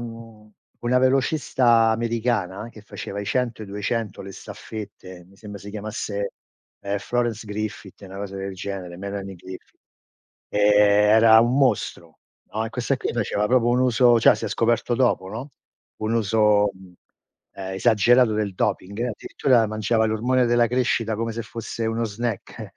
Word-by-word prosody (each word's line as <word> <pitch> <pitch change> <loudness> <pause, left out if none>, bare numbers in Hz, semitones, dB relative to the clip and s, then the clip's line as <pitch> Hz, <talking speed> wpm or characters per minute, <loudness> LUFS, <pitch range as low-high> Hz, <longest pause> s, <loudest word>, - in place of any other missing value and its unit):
mhmm, 115 -2 -10 0.3
una 125 +1 +2
velocista 130 -3 +3
americana, 115 -3 -1
che 110 - -13
faceva 100 -1 -7
i - - -5
100, 120 -2 -1
i - - -8
200, 105 +2 -3
le 95 0 -9
staffette, 95 -4 -9
mi 100 +2 -21
sembra 105 -1 -10
si 100 +2 -9
chiamasse, 105 -1 -4 0.5
ehm, 100 0 -2
Florence 115 0 -2
Griffith, 105 -1 -6
una 95 0 -9
cosa 100 -1 -6
del 95 0 -5
genere, 95 -2 -6
Melanie 100 0 -6
Griffith. 95 +2 -12 0.7
Ehm, 105 - -1 0.5
era 110 0 +7
un 120 +3 +2
mostro, 135 -2 0 0.3
no, 110 +1 -1
e - - -4
questa 125 +3 -1
qui, - - -3
faceva 105 -2 -1
proprio 120 0 +3
un 120 +1 +2
uso 120 -1 +4
cioè - - +6
si - - -6
è - - -2
scoperto 120 +1 +1
dopo, 120 -7 +1
no, 115 +8 -7 0.5
un 110 +1 0
uso, 105 -2 +3
ehm, 95 -1 -16 0.8
esagerato 120 +3 +4
del 105 -2 -1
doping, 100 +1 -2
addirittura 120 0 +1
mangiava 110 +1 +1
l'ormone 125 +4 +1
della 120 0 +3
crescita 120 -2 0
come 115 +1 -2
se 115 - -4
fosse 115 0 -5
uno 115 +1 -1
snack, 115 0 -5
110 Hz, 155 wpm, -23 LUFS, 100-120 Hz, 0.8 s, era